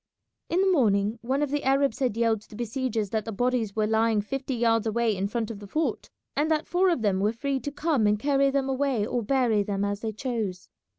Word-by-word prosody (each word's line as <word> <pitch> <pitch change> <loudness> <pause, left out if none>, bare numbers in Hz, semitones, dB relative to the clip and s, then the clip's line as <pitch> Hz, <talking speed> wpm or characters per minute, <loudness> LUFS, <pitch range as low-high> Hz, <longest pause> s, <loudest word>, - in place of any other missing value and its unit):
In 355 +3 +2
the 385 0 +3
morning 215 - +2
one 265 +4 0
of 285 - -2
the 290 0 -1
Arabs 275 -2 +2
had 250 -5 0
yelled 225 -2 +2
to 215 - -21
the - - -11
besiegers 230 -3 -2
that 220 -1 0
the 225 - -5
bodies 235 -1 0
were 215 -1 +1
lying 220 0 +2
fifty 270 +5 -3
yards 230 -1 +2
away 225 -1 +1
in 195 +1 -1
front 230 +1 -3
of 210 - -8
the 205 - -10
fort, 310 +10 -2 0.3
and 300 +2 +1
that 315 -1 +1
four 370 +2 +3
of 330 -10 0
them 195 -3 +2
were 205 +2 +2
free 270 +4 -2
to 285 +4 -5
come 290 -7 +1
and 210 0 +3
carry 275 +3 +2
them 270 -1 0
away 265 -5 0
or 240 +2 -1
bury 235 -2 +2
them 200 0 -1
as 205 0 -2
they 220 0 -3
chose. 215 -5 -4
230 Hz, 240 wpm, -26 LUFS, 210-275 Hz, 0.3 s, the